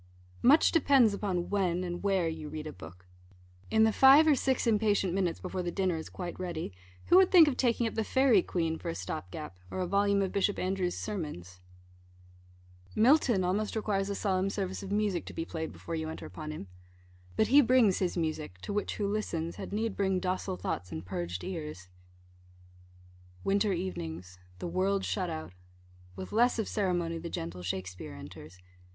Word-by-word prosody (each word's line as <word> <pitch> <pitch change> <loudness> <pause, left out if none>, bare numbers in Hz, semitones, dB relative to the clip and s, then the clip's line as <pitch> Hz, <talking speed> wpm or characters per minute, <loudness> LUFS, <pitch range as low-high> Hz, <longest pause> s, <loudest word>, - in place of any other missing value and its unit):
Much 290 +6 +6
depends 275 - +4
upon 190 -4 -2
when 185 -3 +1
and 175 -1 -4
where 195 -4 +1
you 160 -2 -5
read 155 0 -6
a 155 - -6
book. 90 +1 -12 0.6
In 220 0 +4
the 220 -1 +4
five 270 +6 +8
or 310 - +6
six 265 -1 0
impatient 210 -5 +2
minutes, 180 -3 0
before 185 0 -4
the 175 - -2
dinner 185 -1 0
is 160 - -6
quite 175 -1 -6
ready, 170 - -4 0.3
who 355 - +6
would 380 -1 +6
think 340 -4 +8
of 280 - +1
taking 240 -2 +1
up 225 - -2
the 220 - -1
Fairy 260 -3 +4
Queen 165 -2 -2
for - - -5
a 85 - -3
stop 90 0 -5
gap, 95 -5 -8
or - - -5
a 185 - 0
volume 200 +2 +2
of 190 - -2
Bishop 200 0 +1
Andrewes' 185 -1 -1
sermons? 150 - -5 1.4
Milton 235 -4 +4
almost 205 +5 -1
requires 205 -2 -1
a 200 - -2
solemn 190 -1 0
service 190 -2 -3
of 195 0 -7
music 205 -4 0
to - - -8
be 165 - -3
played 160 -1 -5
before 170 - -8
you 160 -1 -2
enter 160 - -7
upon 155 -1 -7
him. 155 -9 -6 0.7
But 220 - +2
he 285 +3 +8
brings 245 -6 +4
his 185 -1 -1
music, 155 - -3
to - - -5
which, 205 - -2
who 205 - -1
listens, 170 -6 -2
had - - -7
need 220 +1 -1
bring 190 -2 +1
docile 185 - -2
thoughts, 90 -1 -4
and 80 - -6
purged 90 -1 -4
ears. 150 - -6 1.5
Winter 200 +1 +2
evenings 90 - -5 0.2
the - - -5
world 190 +3 0
shut 185 -4 -1
out 155 - -6 0.6
with 95 0 -7
less 240 +3 +3
of 220 - -1
ceremony 175 -5 -1
the 170 +1 -6
gentle 85 - -5
Shakspeare 90 0 -5
enters. 80 +5 -11
185 Hz, 185 wpm, -30 LUFS, 160-210 Hz, 1.5 s, five